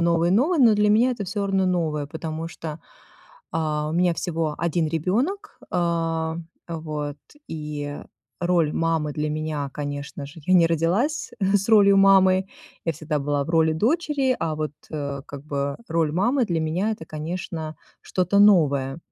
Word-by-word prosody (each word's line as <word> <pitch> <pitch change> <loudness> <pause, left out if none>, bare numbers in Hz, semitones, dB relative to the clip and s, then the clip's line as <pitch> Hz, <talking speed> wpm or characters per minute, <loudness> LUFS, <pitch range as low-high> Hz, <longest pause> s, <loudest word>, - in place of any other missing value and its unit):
новой-новой, 175 - +3
но 230 -4 +6
для 210 0 +3
меня 225 +5 +4
это 235 -5 -3
всё 200 +2 -2
равно 195 -1 +1
новое, 160 -5 0
потому 160 +2 -5
что, 165 -1 -8 0.8
э, - - 0 0.3
у - - -4
меня 175 +1 +3
всего 160 -2 -2
1 170 -1 0
ребёнок, 235 - -1
э, 165 -2 0 0.3
вот, 155 -3 -4 0.3
и 150 -2 -5 0.4
роль 175 -4 +2
мамы 165 -2 0
для 150 +1 -2
меня, 150 -2 -3
конечно 145 -1 -5
же, 145 +4 -12
я 185 - +4
не 170 -2 +6
родилась 175 - 0
с 195 +1 +2
ролью 200 -3 +6
мамы, 190 -1 +5 0.4
я 165 - 0
всегда 155 0 -3
была 145 0 -1
в 160 - -6
роли 160 -1 +3
дочери, 265 - +1
а 155 - -1
вот, 155 -1 -3 0.2
э, 140 -2 -4
как 140 0 -9
бы, 140 -1 -2
роль 160 -2 +1
мамы 240 - +2
для 170 -4 0
меня- 170 +7 0
это, 210 - -7
конечно, 160 0 -5 0.3
что-то 185 +2 +1
новое. 145 -9 +4
165 Hz, 155 wpm, -24 LUFS, 150-195 Hz, 0.8 s, но